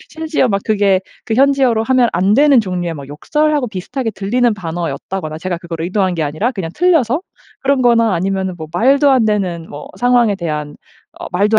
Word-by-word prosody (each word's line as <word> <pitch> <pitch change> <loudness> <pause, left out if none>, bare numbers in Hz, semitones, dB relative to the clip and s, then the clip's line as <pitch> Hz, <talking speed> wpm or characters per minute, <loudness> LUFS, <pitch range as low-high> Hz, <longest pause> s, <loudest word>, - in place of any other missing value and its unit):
심지어 315 -5 -1
막 200 -1 -1
그게 200 -3 +2 0.3
그 220 - -1
현지어로 265 -4 +3
하면 255 -1 +3
안 185 +4 +2
되는 280 -2 +5
종류의 180 -4 -3
뭐 140 -3 -9
욕설하고 295 - 0
비슷하게 225 +5 -4
들리는 230 +5 +1
단어였다거나 170 -1 -5
제가 175 +1 -3
그걸 170 -2 -6
의도한 185 +1 0
게 165 - -2
아니라 155 +11 -1
그냥 190 -8 -5
틀려서. 320 -6 +2 0.4
그런 270 -1 +1
거나 230 -4 +3
아니면은 190 +1 -2
뭐 155 - -6
말도 275 +8 +3
안 255 -4 +3
되는 185 -6 -1
뭐 145 +1 -9
상황에 245 -4 +3
대한 150 -4 -4 0.4
어 - - -7
말도 205 +4 +3
205 Hz, 395 characters per minute, -16 LUFS, 175-250 Hz, 0.4 s, 되는